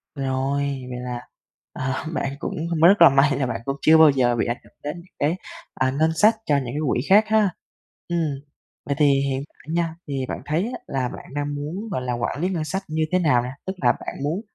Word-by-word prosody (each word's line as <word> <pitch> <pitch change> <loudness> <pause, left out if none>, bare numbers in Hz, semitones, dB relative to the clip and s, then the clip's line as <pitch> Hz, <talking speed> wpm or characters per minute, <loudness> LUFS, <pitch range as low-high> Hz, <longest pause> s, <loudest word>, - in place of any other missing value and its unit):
Rồi, 135 0 -1 0.3
vậy 125 0 -5
là, 125 -1 -5 0.5
ờ, 130 0 -2 0.2
bạn 140 -3 -2
cũng - - -4 0.3
rất 200 +1 +5
là 170 - +10
may 135 0 +3
là 135 - 0
bạn 115 -2 -3
cũng 135 - -1
chưa 160 +1 +6
bao 160 -1 +8
giờ 125 -3 +2
bị 115 - 0
ảnh 120 +1 -1
hưởng - - -21
đến 150 +1 -3
những 175 +1 -15
cái, 150 +4 +1 0.4
à, 130 0 +1
ngân 160 +1 +3
sách 215 +6 +5
cho 145 - +2
những 135 - -2
cái 125 +5 -4
quỹ 120 - +1
khác 205 +3 +7
ha. 215 -2 +3 0.6
Ừm, 175 0 0 0.7
vậy 140 - -1
thì 150 - +5 0.2
hiện 135 +1 -2
tại 160 - -10
nha, 165 -1 0
thì 135 -2 -2
bạn - - -4
thấy 155 +5 0
á - - -5
là 130 -2 -1
bạn - - -10
đang 145 0 -2
muốn, 170 +10 -5
gọi 150 - -1
là, 125 -1 -2
quản 120 +4 -2
lý 180 - +1
ngân 170 -4 -2
sách 190 +5 -3
như 155 0 -1
thế 185 - +3
nào 150 -8 +3
nà? 125 +1 -6
Tức 190 - -1
là - - +6
bạn - - -7
muốn 160 +7 -1
145 Hz, 240 wpm, -23 LUFS, 130-165 Hz, 0.7 s, là